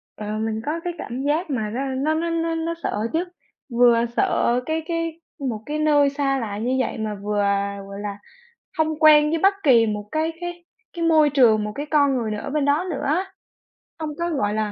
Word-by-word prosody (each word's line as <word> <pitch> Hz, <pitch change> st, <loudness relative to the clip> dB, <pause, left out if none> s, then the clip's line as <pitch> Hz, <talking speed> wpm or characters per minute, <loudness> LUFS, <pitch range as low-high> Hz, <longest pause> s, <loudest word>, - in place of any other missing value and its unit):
Ờ, 210 Hz, -, -7 dB
mình 220 Hz, 0 st, -2 dB
có 315 Hz, +3 st, -2 dB
cái 350 Hz, -, -3 dB
cảm 250 Hz, -3 st, -5 dB
giác 305 Hz, +5 st, 0 dB
mà 220 Hz, -6 st, -1 dB
nó 255 Hz, +6 st, -3 dB
nó 270 Hz, +3 st, 0 dB
nó 330 Hz, +2 st, -1 dB
nó 330 Hz, 0 st, -1 dB
nó 325 Hz, +1 st, -2 dB
sợ -, -, -1 dB, 0.2 s
chứ, 330 Hz, +2 st, +1 dB, 0.6 s
vừa 235 Hz, -1 st, +5 dB
sợ 240 Hz, +1 st, +2 dB
cái 320 Hz, 0 st, -2 dB
cái 330 Hz, -1 st, -3 dB, 0.3 s
một 220 Hz, -3 st, -4 dB
cái 300 Hz, +1 st, -3 dB
nơi 295 Hz, -2 st, +4 dB
xa 275 Hz, -1 st, 0 dB
lạ 210 Hz, -4 st, -4 dB
như 245 Hz, +5 st, -1 dB
vậy 255 Hz, -, -1 dB
mà 215 Hz, -1 st, -3 dB
vừa, 205 Hz, +1 st, -2 dB, 0.5 s
gọi 200 Hz, 0 st, -8 dB
là, 205 Hz, -1 st, -5 dB, 0.6 s
hông 315 Hz, -1 st, 0 dB
quen 300 Hz, -1 st, +7 dB
với 325 Hz, +1 st, 0 dB
bất 390 Hz, +4 st, +4 dB
kỳ 240 Hz, -6 st, +6 dB
một 210 Hz, -1 st, -4 dB
cái 315 Hz, +1 st, 0 dB
cái 350 Hz, 0 st, -6 dB, 0.3 s
cái 335 Hz, -1 st, -2 dB
môi 315 Hz, -2 st, +5 dB
trường, 235 Hz, -6 st, +4 dB
một 210 Hz, -, -3 dB
cái 290 Hz, -, -4 dB
con 285 Hz, -3 st, +3 dB
người 225 Hz, -3 st, -2 dB
nào 210 Hz, -, -3 dB
ở -, -, -5 dB
bên 295 Hz, 0 st, 0 dB
đó 290 Hz, +5 st, +2 dB
nữa 280 Hz, -, -4 dB
á, 320 Hz, +7 st, +1 dB, 0.7 s
hông 315 Hz, -1 st, -3 dB
có, 340 Hz, -, 0 dB
gọi 210 Hz, -11 st, 0 dB
là, 215 Hz, -1 st, -1 dB
285 Hz, 220 wpm, -23 LUFS, 225-320 Hz, 0.7 s, quen